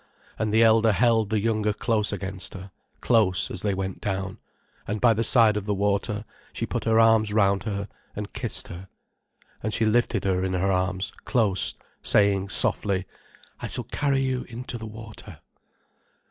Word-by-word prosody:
And 110 -1 0
the 110 +2 +4
elder 110 -1 +5
held 115 -1 +2
the 110 - +1
younger 110 -1 0
close 110 -1 0
against 95 -1 -4
her, 95 0 -9 0.3
close, 95 -7 +2
as 90 - -4
they 100 -2 0
went 95 -1 -4
down, 95 -1 -3 0.5
and 105 +1 -2
by 115 0 +5
the 115 +1 -1
side 115 -3 +5
of 105 -1 -4
the 105 - 0
water, 105 +2 -1 0.3
she - - -3
put - - -4
her 115 0 +3
arms 110 -2 +4
round 100 -1 +2
her, 100 -2 -3 0.3
and 105 0 -6
kissed - - +1
her. 90 +2 -9 0.7
And 110 - -2
she 115 - +2
lifted 115 +2 +1
her 95 -1 0
in 95 0 -1
her 95 +2 +1
arms, 95 +1 -1
close, 105 -7 +1 0.3
saying, 100 -1 +2
softly: 95 -2 0 0.5
"I - - -5
shall - - -3
carry 140 -2 0
you 130 -1 -1
into 120 0 -7
the 110 - -7
water." 110 0 -11
105 Hz, 175 wpm, -25 LUFS, 95-115 Hz, 0.7 s, elder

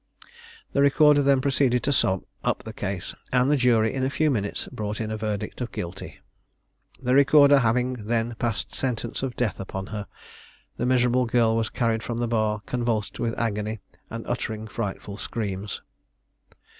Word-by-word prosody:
The 140 - +3
recorder 145 +1 +5
then 140 -1 +4
proceeded 130 -2 +2
to 140 - +2
sum 95 -8 +1 0.2
up - - 0
the 110 - -7
case, 95 -3 -4 0.2
and 125 +2 +3
the - - +5
jury 115 -5 +3
in 130 -1 -1
a 130 - +2
few 155 +2 +1
minutes 100 -5 -2
brought 105 0 -4
in 110 -1 -3
a - - -1
verdict 105 +2 -4
of 120 - -3
guilty. 90 +2 -7 0.8
The 125 0 0
recorder 140 +1 +7
having 125 -1 0
then 115 0 0
passed 115 -3 -2
sentence 120 -3 -2
of 130 -2 -3
death 120 -5 -1
upon 95 0 -5
her, 105 -1 -4 0.7
the 120 - -1
miserable 125 0 +3
girl 115 -1 +3
was 115 -1 0
carried 115 -2 0
from 115 0 -4
the 120 0 0
bar 110 -2 0
convulsed 120 -4 -2
with 115 -1 -1
agony, 110 -1 -2 0.3
and 115 0 -6
uttering 110 -3 -3
frightful 105 -2 -5
screams. 100 -3 -4
115 Hz, 170 wpm, -25 LUFS, 110-130 Hz, 0.8 s, recorder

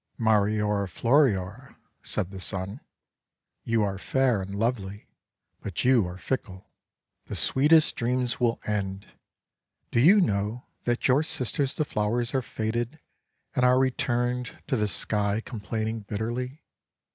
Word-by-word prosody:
"Mariora 105 -2 +2
Floriora," 115 - +1 0.3
said 90 - -2
the 95 - -7
Sun, 95 +5 -3 0.8
"you 115 -1 +1
are 100 -1 -2
fair 130 -2 +1
and 95 +1 -6
lovely, 105 -2 -2 0.6
but 100 +3 -3
you 125 -7 +4
are 90 +1 -7
fickle. 95 -4 -4 0.6
The - - -5
sweetest 150 +4 +4
dreams 125 0 0
will 120 -2 +1
end! 100 -2 -2 0.9
Do - - +2
you 180 - +7
know 105 - 0 0.2
that 120 0 +1
your 135 +2 +4
sisters 140 -3 -1
the 155 - 0
flowers 115 +1 -1
are 135 - +2
faded 120 +4 -3 0.6
and 125 - +2
are 125 0 +5
returned 125 -1 0
to 135 - 0
the 105 -3 +1
Sky 105 0 -1
complaining 110 -1 -4
bitterly? 120 +7 -4
115 Hz, 130 wpm, -27 LUFS, 100-125 Hz, 0.9 s, you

